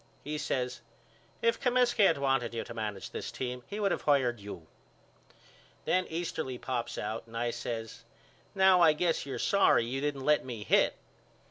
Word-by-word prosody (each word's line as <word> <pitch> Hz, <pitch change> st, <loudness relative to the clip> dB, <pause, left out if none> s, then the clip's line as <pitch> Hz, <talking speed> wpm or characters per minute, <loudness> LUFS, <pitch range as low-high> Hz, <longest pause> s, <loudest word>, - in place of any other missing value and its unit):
He 150 Hz, +1 st, -4 dB
says 125 Hz, -4 st, -2 dB, 0.6 s
If 230 Hz, 0 st, +2 dB
Comiskey 245 Hz, -4 st, +4 dB
had 165 Hz, -, +2 dB
wanted 135 Hz, -4 st, 0 dB
you 115 Hz, -, -2 dB
to -, -, -9 dB
manage 105 Hz, -3 st, -5 dB
this -, -, -5 dB
team 125 Hz, -1 st, -4 dB
he 205 Hz, -, -5 dB
would 200 Hz, -2 st, +1 dB
of -, -, -1 dB
hired 130 Hz, -5 st, +2 dB
you. 100 Hz, -5 st, -9 dB, 1.2 s
Then 185 Hz, 0 st, +1 dB
Easterly 160 Hz, -6 st, -3 dB
pops 120 Hz, -2 st, -3 dB
out 110 Hz, +2 st, -4 dB
and 115 Hz, 0 st, -8 dB
I 120 Hz, 0 st, 0 dB
says 115 Hz, -1 st, -5 dB, 0.5 s
Now 190 Hz, -2 st, +5 dB
I 160 Hz, -2 st, +7 dB
guess 165 Hz, -2 st, 0 dB
you're 135 Hz, -, -4 dB
sorry 200 Hz, -11 st, +3 dB
you 130 Hz, +3 st, -3 dB
didn't 140 Hz, -2 st, -2 dB
let 150 Hz, 0 st, +4 dB
me 120 Hz, -5 st, -6 dB
hit. -, -, +3 dB
135 Hz, 170 wpm, -30 LUFS, 120-170 Hz, 1.2 s, I